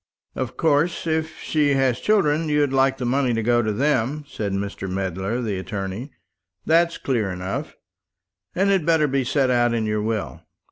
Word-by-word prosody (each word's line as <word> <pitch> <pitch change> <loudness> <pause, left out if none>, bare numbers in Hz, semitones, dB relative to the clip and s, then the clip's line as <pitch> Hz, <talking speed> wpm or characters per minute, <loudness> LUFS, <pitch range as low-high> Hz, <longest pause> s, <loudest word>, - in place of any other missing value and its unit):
"Of 130 -2 -4
course, 160 +2 +1
if 160 -1 -1
she 145 -3 +1
has 130 -3 +1
children, 165 -7 +2
you'd 145 -2 +2
like 135 0 +3
the 125 - -3
money 125 -1 +1
to 115 - -1
go 120 +1 +3
to 110 -2 -1
them," 140 +4 0
said 105 -7 -4
Mr. 100 -1 -4
Medler, 95 +5 -2
the 100 -4 -2
attorney; 100 +6 -5 0.6
"that's 170 +1 +3
clear 115 -7 -1
enough, 90 +1 -4 0.8
and 195 +2 +2
had 190 -4 +2
better 160 -1 +3
be 135 -1 0
set 130 +1 +1
out 120 -1 +2
in 110 -1 0
your 105 0 -1
will. 110 -1 -3
130 Hz, 175 wpm, -23 LUFS, 105-150 Hz, 0.8 s, like